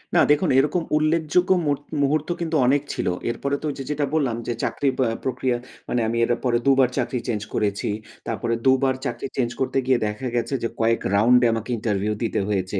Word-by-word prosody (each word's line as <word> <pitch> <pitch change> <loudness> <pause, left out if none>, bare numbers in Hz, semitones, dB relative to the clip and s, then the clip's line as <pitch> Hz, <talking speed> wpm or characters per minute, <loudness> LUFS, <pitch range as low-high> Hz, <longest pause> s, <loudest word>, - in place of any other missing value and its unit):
না, - - +6
দেখুন 150 +4 +3
এরকম 150 +5 +1
উল্লেখযোগ্য 160 +4 +1 0.2
মু-মুহূর্ত 145 +1 0
কিন্তু 165 -1 -1
অনেক 140 +3 +3
ছিল। - - -2 0.2
এরপরে 140 +4 -1
তো - - -5
ওইযে 135 -1 -5
যেটা 150 0 0
বললাম, 135 -7 +1
যে 120 - 0
চাকরি 140 - 0
বা 130 - +3 0.2
প্রক্রিয়া 125 -1 0 0.3
মানে 125 - +1
আমি 115 +1 -1
এর 120 - -1
পরে 120 -1 +3
২ 140 - +6
বার 130 -2 +5
চাকরি 125 -1 -1
চেঞ্জ 110 -4 -1
করেছি। 100 -1 -1 0.4
তারপরে 115 -1 -1
২ 130 - +7
বার 130 -1 +2
চাকরি 140 - -3
চেঞ্জ 120 -3 +1
করতে 130 - 0
গিয়ে 130 -2 +3
দেখা 105 +5 -4
গেছে 120 +3 -1
যে - - +2
কয়েক 115 0 +2
round 120 +5 +5
এ - - +6
আমাকে 115 +1 -4
ইন্টারভিউ 105 -1 -1
দিতে 115 - 0
হয়েছে। 95 -1 -1
130 Hz, 200 wpm, -23 LUFS, 115-145 Hz, 0.4 s, ২